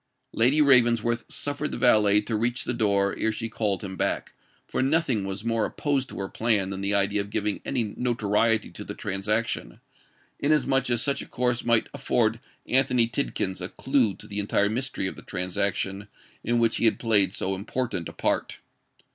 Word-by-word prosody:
Lady 135 +7 +4
Ravensworth 120 -3 +3
suffered 145 +1 -3
the - - -4
valet 105 -4 +4
to 110 +1 -3
reach 120 +3 0
the - - -2
door 100 -4 +1
ere 110 - +1
she 115 +1 -4
called 105 -4 -2
him 95 -1 -6
back; - - -2 0.3
for - - -2
nothing 135 -7 +1
was 95 +3 -5
more 115 -1 +1
opposed 140 -3 -1
to - - -9
her 100 - -3
plan 105 -3 +1
than 95 0 -4
the 100 +1 +1
idea 100 +1 +2
of 100 - -7
giving 105 -1 -1
any 130 -4 0
notoriety 115 -2 +1
to - - -8
the - - -7
transaction, 105 - -2 0.6
inasmuch 135 -3 +2
as 120 0 +2
such 140 +2 0
a - - -8
course 125 0 -1
might 115 -1 +2
afford 115 -1 0 0.3
Anthony 125 -2 +3
Tidkins 100 -7 -2
a 90 - -4
clue 130 -8 +1
to - - -11
the 105 -1 -4
entire 100 0 +1
mystery 125 -2 -2
of 95 - -3
the - - -11
transaction 95 +2 -2 0.4
in 120 +1 +1
which 115 -1 +2
he - - +1
had 110 - +3
played 105 -4 +3
so 95 - -2
important 100 -2 -3
a - - -11
part. - - -1
110 Hz, 185 wpm, -26 LUFS, 100-125 Hz, 0.6 s, Lady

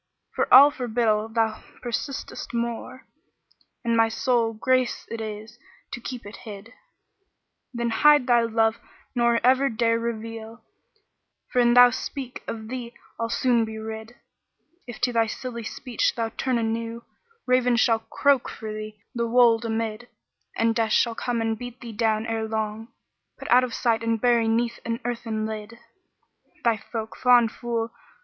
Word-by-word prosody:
For - - -1
all 280 +3 +10
forbiddal 225 -5 0
thou 220 -1 +1 0.2
persistest 245 +1 -4
more, 235 +2 -4 0.4
* - - -39
And 235 0 +2
my 225 0 +4
sole 230 0 +1
grace 255 +3 0
it 230 -1 -4
is 215 +2 -7 0.3
to 240 - -5
keep 245 -1 -7
it 205 - -9
hid; 215 +1 -10 1.0
Then 235 -2 -2
hide 295 +4 +5
thy 240 -2 +4
love 225 0 +1 0.3
nor 235 -1 +2
ever 260 +2 +4
dare 230 0 +1
reveal, 225 0 -6 0.4
* - - -47
For 250 - +1
an 240 0 +4
thou 245 0 +9
speak, 255 0 -6
of 220 -1 -5
thee 245 -2 -6 0.2
I'll 230 0 -1
soon 235 0 +2
be 220 0 -5
rid 220 +1 -7 0.7
If 240 - -8
to 245 - +1
thy 225 -1 +3
silly 235 +1 -5
speech 240 +1 -2
thou 230 -1 -1
turn 255 +2 -1
anew, 230 +1 -3 0.2
* 460 0 -38
Ravens 250 -1 +3
shall 225 -2 +3
croak 275 +3 +1
for 220 -2 -7
thee 215 0 -7
the 235 -1 -1
wold 235 -1 +4
amid: 225 +1 -3 0.5
And 230 0 +2
Death 225 -2 0
shall 235 - +3
come 235 0 -2
and 225 -1 -1
beat 245 0 -8
thee 235 -2 -8
down 220 0 0
ere 225 -1 -2
long, 220 0 -3 0.3
* - - -55
Put - - -7
out 250 +1 +7
of 245 -3 -3
sight 230 -2 +1
and 230 0 0
bury 235 -1 +3
'neath 235 +1 0
an 230 0 -3
earthen 230 -3 -3
lid: 220 +1 -6 0.9
Thy 230 -2 +3
folk, 220 +1 -6
fond 245 -2 +4
fool! 235 -1 -3
230 Hz, 165 wpm, -25 LUFS, 225-245 Hz, 1.0 s, all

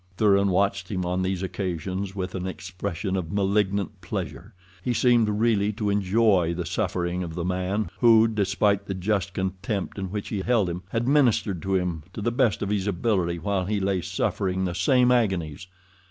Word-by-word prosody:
Thuran 100 -1 +4
watched 100 0 +1
him 90 -3 -2
on 90 +1 -1
these 95 0 -1
occasions 95 +1 -3
with 95 -2 -4
an 95 0 -3
expression 95 0 -4
of 85 -4 -3
malignant 100 -1 0
pleasure—he 90 +3 -6
seemed 120 -3 +4
really 105 -1 +2
to 105 -1 -1
enjoy 100 -3 +2
the 90 0 -3
suffering 90 -1 -1
of 85 -2 -5
the 85 -1 -3
man 95 +3 -1
who, 115 -2 +6
despite 100 -1 +1
the 95 - -3
just 95 -1 -1
contempt 95 +2 -3
in 95 - -3
which 105 +1 -4
he 100 - -2
held 105 -4 +1
him, 90 +1 -5
had 115 +4 -1
ministered 120 - +2
to 95 +2 -1
him 90 -3 -1
to - - -6
the 120 - +1
best 120 -4 +1
of 100 - -2
his 105 -1 -1
ability 95 -3 0
while 95 +2 -1
he 105 +1 -1
lay 95 -1 0
suffering 95 +1 -1
the 90 - -2
same 125 +8 +3
agonies. 95 - 0
95 Hz, 180 wpm, -25 LUFS, 90-105 Hz, -, who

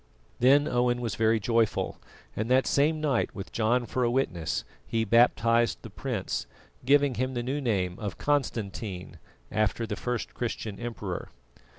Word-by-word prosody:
Then 140 +4 +5
Owen 120 0 +1
was 115 -3 -2
very 110 0 +2
joyful, 115 +1 +1 0.4
and 110 +2 -2
that 130 +1 +4
same 155 +3 +2
night, 145 -6 0
with 95 -1 -7
John 120 +2 +1
for 125 +2 -1
a 120 - +3
witness, 120 -10 -1 0.2
he 115 -1 0
baptised 115 +1 +3
the 115 - -9
prince, 115 -2 -3 0.4
giving 140 +1 +4
him 130 0 -1
the 120 - -1
new 135 +4 -2
name 95 -8 0
of 100 -5 -4
Constantine, 110 -8 -2 0.3
after 110 +2 +1
the 105 -2 -3
first 125 0 -3
Christian 110 -4 -4
emperor. 110 -6 -5
115 Hz, 155 wpm, -28 LUFS, 110-130 Hz, 0.4 s, Then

